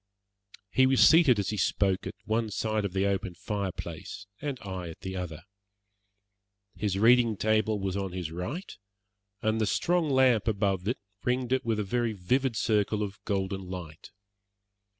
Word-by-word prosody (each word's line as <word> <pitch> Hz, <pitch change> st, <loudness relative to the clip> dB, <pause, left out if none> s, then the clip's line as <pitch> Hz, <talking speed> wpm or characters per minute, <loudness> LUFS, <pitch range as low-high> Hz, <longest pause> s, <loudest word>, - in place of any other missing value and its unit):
He 130 Hz, 0 st, +4 dB
was 130 Hz, -1 st, +6 dB
seated 160 Hz, -8 st, +6 dB
as 100 Hz, -, -1 dB
he 105 Hz, -, -3 dB
spoke 95 Hz, -1 st, +1 dB
at 95 Hz, -, -6 dB
one 110 Hz, 0 st, 0 dB
side 110 Hz, 0 st, -1 dB
of 95 Hz, -, -3 dB
the 95 Hz, 0 st, +1 dB
open 95 Hz, -2 st, -1 dB
fire 100 Hz, +2 st, -3 dB
place, 85 Hz, +5 st, -7 dB, 0.2 s
and 145 Hz, -3 st, -3 dB
I 95 Hz, -4 st, -5 dB
at 80 Hz, -, -11 dB
the 95 Hz, 0 st, -5 dB
other. 85 Hz, -3 st, -5 dB, 1.3 s
His 100 Hz, -3 st, -1 dB
reading 115 Hz, 0 st, +5 dB
table 110 Hz, 0 st, +1 dB
was 95 Hz, -1 st, -2 dB
on 100 Hz, -2 st, -2 dB
his 90 Hz, -3 st, -4 dB
right, 115 Hz, -, -5 dB, 0.7 s
and 110 Hz, 0 st, +1 dB
the 110 Hz, -, +2 dB
strong 170 Hz, -, +1 dB
lamp 130 Hz, -5 st, +4 dB
above 100 Hz, -3 st, 0 dB
it 120 Hz, -, 0 dB, 0.3 s
ringed 125 Hz, 0 st, 0 dB
it 130 Hz, -, +1 dB
with 115 Hz, -2 st, 0 dB
a -, -, 0 dB
very 115 Hz, +3 st, -1 dB
vivid 125 Hz, +6 st, 0 dB
circle 105 Hz, -1 st, +1 dB
of 105 Hz, 0 st, -7 dB
golden 95 Hz, -1 st, -2 dB
light. 85 Hz, -4 st, -8 dB
105 Hz, 170 wpm, -28 LUFS, 95-115 Hz, 1.3 s, was